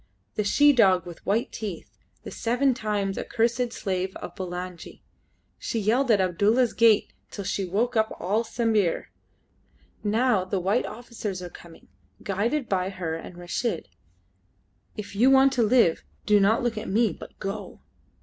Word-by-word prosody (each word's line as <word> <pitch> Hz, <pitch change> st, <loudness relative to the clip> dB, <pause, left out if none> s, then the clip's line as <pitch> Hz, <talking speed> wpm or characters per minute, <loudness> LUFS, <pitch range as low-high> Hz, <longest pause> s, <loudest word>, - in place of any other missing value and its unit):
"The 210 Hz, -, -1 dB
she 290 Hz, +8 st, +5 dB
dog 190 Hz, -8 st, +4 dB
with 175 Hz, -2 st, -10 dB
white 220 Hz, +4 st, +1 dB
teeth; 205 Hz, -6 st, -7 dB, 0.2 s
the -, -, -8 dB
seven 250 Hz, +3 st, +1 dB
times 205 Hz, -4 st, -2 dB
accursed 235 Hz, +1 st, 0 dB
slave 190 Hz, -2 st, -3 dB
of -, -, -7 dB
Bulangi. 180 Hz, -1 st, -7 dB, 0.6 s
She -, -, -3 dB
yelled 235 Hz, +5 st, +1 dB
at 215 Hz, -3 st, +5 dB
Abdulla's 205 Hz, +7 st, +2 dB
gate 230 Hz, -3 st, +4 dB, 0.2 s
till 200 Hz, -, -6 dB
she 195 Hz, 0 st, -2 dB
woke 220 Hz, +7 st, -1 dB
up 220 Hz, 0 st, +2 dB
all 215 Hz, +5 st, 0 dB
Sambir. 220 Hz, -6 st, 0 dB, 0.9 s
Now 220 Hz, -1 st, +2 dB
the 185 Hz, +1 st, -2 dB
white 195 Hz, +7 st, +1 dB
officers 215 Hz, -5 st, -6 dB
are 175 Hz, -, -7 dB
coming, 170 Hz, 0 st, -15 dB, 0.4 s
guided 225 Hz, +8 st, -1 dB
by 185 Hz, -1 st, 0 dB
her 180 Hz, -4 st, -4 dB
and 165 Hz, +2 st, -7 dB
Reshid. 175 Hz, -, -3 dB, 1.1 s
If 205 Hz, -1 st, -7 dB
you 240 Hz, +6 st, +5 dB
want 270 Hz, 0 st, +5 dB
to 245 Hz, -, +1 dB
live, 225 Hz, -6 st, +3 dB, 0.2 s
do 210 Hz, -1 st, +5 dB
not 220 Hz, +6 st, +3 dB
look 230 Hz, -3 st, -1 dB
at 215 Hz, -, -6 dB
me, 215 Hz, -1 st, +2 dB
but -, -, -12 dB
go!" 200 Hz, +2 st, -6 dB
210 Hz, 155 wpm, -26 LUFS, 190-235 Hz, 1.1 s, she